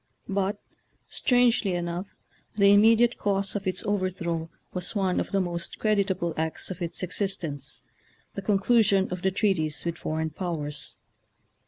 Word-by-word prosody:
But, 200 0 0 0.5
strangely 240 -6 +2
enough, 175 +2 -3 0.5
the 200 -1 +6
im 205 - +7
mediate 230 +2 +4
cause 200 -1 0
of 200 -1 -3
its 185 -1 0
overthrow 180 -5 -1 0.2
was 180 +3 -3
one 190 -3 +1
of - - -2
the 200 - +2
most 175 -2 -2
creditable 195 -5 +1
acts 160 +3 -1
of 185 - -7
its 170 +1 -2
exist 190 +1 -1
ence 145 -4 -4 0.2
— - - -36
the 200 - -4
conclusion 200 0 +3
of 180 0 -4
the 190 - +2
treaties 185 -7 0
with 170 -1 -2
foreign 160 0 -2
powers. 155 -4 -3
190 Hz, 155 wpm, -27 LUFS, 170-200 Hz, 0.5 s, im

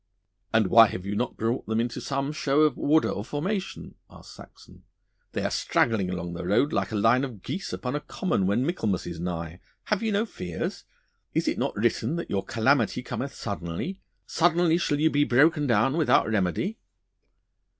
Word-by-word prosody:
'And 110 -1 +3
why 115 +4 +7
have 90 -2 -6
you 100 +1 -3
not 120 +3 -2
brought 115 +3 -2
them 110 +1 0
into 120 0 -2
some 140 +1 -2
show 150 -1 +1
of 155 -4 +3
order 155 +2 +2
or 100 - -4
formation?' 185 - -4 0.2
asked - - -14
Saxon. - - -15 0.5
'They - - -2
are - - -1
straggling 105 -6 +1
along 90 -1 -4
the 85 - -5
road 105 - +2
like - - -1
a - - -3
line 115 +5 +3
of 120 -8 -6
geese 195 - -4
upon 125 +2 -3
a - - 0
common 150 - -1
when 110 +6 +1
Michaelmas 110 - -1
is 85 -2 -6
nigh. 85 -1 -4 0.2
Have 210 -1 -1
you 225 -1 0
no 205 +2 +1
fears? 90 - -5 0.5
Is - - +1
it - - 0
not - - -1
written 120 +8 0
that 170 - -5
your 95 - 0
calamity 125 +1 +1
cometh 135 +2 -5
suddenly 100 - -5 0.2
suddenly 170 0 +2
shall 145 -4 0
you 160 +1 +3
be 145 +1 +3
broken 145 +3 +3
down 135 +3 +2
without 160 -3 +3
remedy? 110 - -1
125 Hz, 185 wpm, -26 LUFS, 100-155 Hz, 0.5 s, why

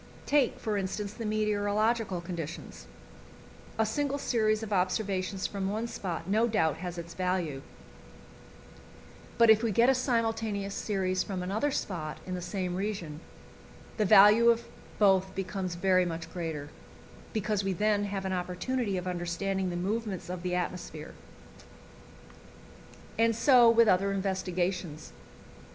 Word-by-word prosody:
Take, 285 -4 +2
for 215 -2 -2
instance, 200 +1 -3
the 225 -1 -5
meteorological 210 -1 0
conditions: 170 -2 -7 0.9
a 220 - +3
single 280 +5 -1
series 215 -5 +1
of 215 -1 -4
observations 190 0 -1
from 195 -1 -2
one 215 +3 -2
spot 180 -7 -5
no 220 +4 +2
doubt 160 -9 +1
has 175 0 -6
its 170 0 -7
value, 180 -6 -2 1.8
but 230 -1 +7
if 220 0 +5
we 230 -2 0
get 235 +5 +4
a - - +6
simultaneous 225 -5 -1
series 185 -3 -1
from 185 -3 -3
another 210 +10 0
spot 165 - -3
in 185 - -5
the 180 - -3
same 180 0 -3
region, 185 -6 -4 0.8
the 215 - +2
value 210 +5 +7
of 235 0 +2 0.3
both 190 -2 +3
becomes 190 -2 -3
very 185 +1 +3
much 165 -1 -5
greater, 160 -4 -4 0.6
because 210 -2 -1
we 195 - 0
then 205 +2 +1
have 195 -1 -4
an 190 - -1
opportunity 190 +4 -2
of 180 - -4
understanding 185 +2 -2
the 175 - -4
movements 200 +1 -3
of 180 -1 -5
the 180 0 -2
atmosphere. 180 0 -4 2.1
And 230 0 +3
so 240 0 +6
with 230 0 +5
other 195 +1 +3
investigations. 185 -4 -2
195 Hz, 135 wpm, -29 LUFS, 180-220 Hz, 2.1 s, but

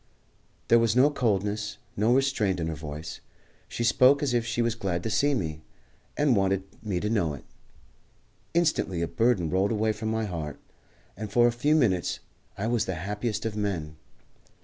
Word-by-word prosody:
There 115 - +7
was 115 -1 +2
no 135 +4 +5
coldness, 105 -5 -1 0.2
no 110 +3 +2
restraint 125 -9 +1
in 85 - -1
her - - -2
voice. 75 +1 -7 0.5
She 120 - -4
spoke 130 +4 +5
as 135 -4 0
if 120 -1 +1
she 120 +1 0
was 115 -1 +1
glad 95 -6 -3
to 110 - -2
see 145 +5 +2
me, 80 -8 -3 0.6
and 145 -4 +3
wanted 95 -1 +1 0.2
me 100 -5 -2
to 105 - -2
know 95 -9 0
it. 70 - -12 1.1
Instantly 150 - +1
a - - -1
burden 115 -9 +1
rolled 95 +3 +2
away 110 0 +1
from 110 +1 -4
my 110 0 -1
heart, 80 -7 -5 0.6
and 105 0 -6
for 120 +2 +5
a 120 - +4
few 145 +6 +1
minutes 100 - +1 0.4
I 100 - -2
was 115 -1 +1
the 95 - -3
happiest 105 +6 -3
of 110 -2 -2
men. 90 -8 -3
105 Hz, 180 wpm, -27 LUFS, 95-120 Hz, 1.1 s, There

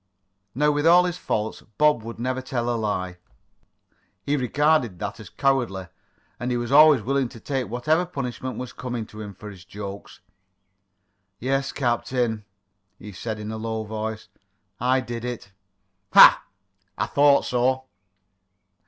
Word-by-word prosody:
Now, 150 +3 +3
with 145 +2 +1
all 175 +2 +7
his 180 0 -3
faults, 110 +1 -2 0.2
Bob 150 -5 +4
would 115 +1 -8
never 130 +2 -2
tell 120 -2 -2
a - - 0
lie. 95 -5 -3 1.0
He 145 - 0
regarded 145 - +1
that - - -5
as - - -10
cowardly, 120 -10 0 0.5
and 120 - -3
he 125 - 0
was 120 +1 -4
always 150 -4 +7
willing 135 0 0
to 115 - -12
take 135 0 -3
whatever 155 +9 +1
punishment 130 -4 -5
was 125 -1 -6
coming 120 -3 -5
to 110 0 -11
him 100 -2 -8
for 105 +3 -9
his 95 -3 -13
"jokes." 100 +2 -9 1.2
"Yes, 135 +4 -1
captain," 120 -3 -1 0.5
he 105 - -10
said 110 +3 -5
in 105 0 -6
a 110 - -5
low 110 0 -3
voice. 110 0 -5 0.5
"I 130 +2 +2
did 115 -1 -6
it." 120 -5 -6 0.6
"Ha! - - +9 0.5
I - - 0
thought 145 0 +4
so." 130 +1 +1
120 Hz, 150 wpm, -24 LUFS, 110-135 Hz, 1.2 s, Ha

